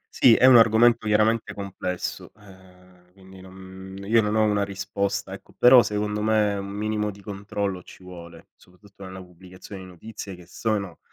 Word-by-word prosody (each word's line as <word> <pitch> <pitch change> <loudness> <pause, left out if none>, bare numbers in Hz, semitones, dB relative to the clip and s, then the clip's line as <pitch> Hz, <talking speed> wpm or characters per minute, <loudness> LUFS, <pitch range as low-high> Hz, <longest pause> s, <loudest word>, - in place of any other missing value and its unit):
Sì, 120 -3 +6
è 130 - +4
un 130 -2 +8
argomento 115 0 +4
chiaramente 110 +2 +1
complesso, 95 -2 -6
ehm, 90 -3 -20
quindi 95 0 -16
non 95 0 -12
io 115 +3 +3
non 105 0 -2
ho 110 - +3
una 105 -1 +1
risposta 100 0 -4
ecco, 95 - -13
però 125 0 +7
secondo 105 0 -3
me, 105 -1 +1
un 100 0 -5
minimo 105 +1 -3
di 100 - -10
controllo 100 -2 -4
ci 90 - -16
vuole, 85 -2 -13
soprattutto 100 +2 -17
nella 95 0 -9
pubblicazione 90 +2 -13
di 95 - -11
notizie, 100 +2 -10
che 90 -1 -15
sono 100 -2 -4
100 Hz, 165 wpm, -24 LUFS, 95-105 Hz, -, un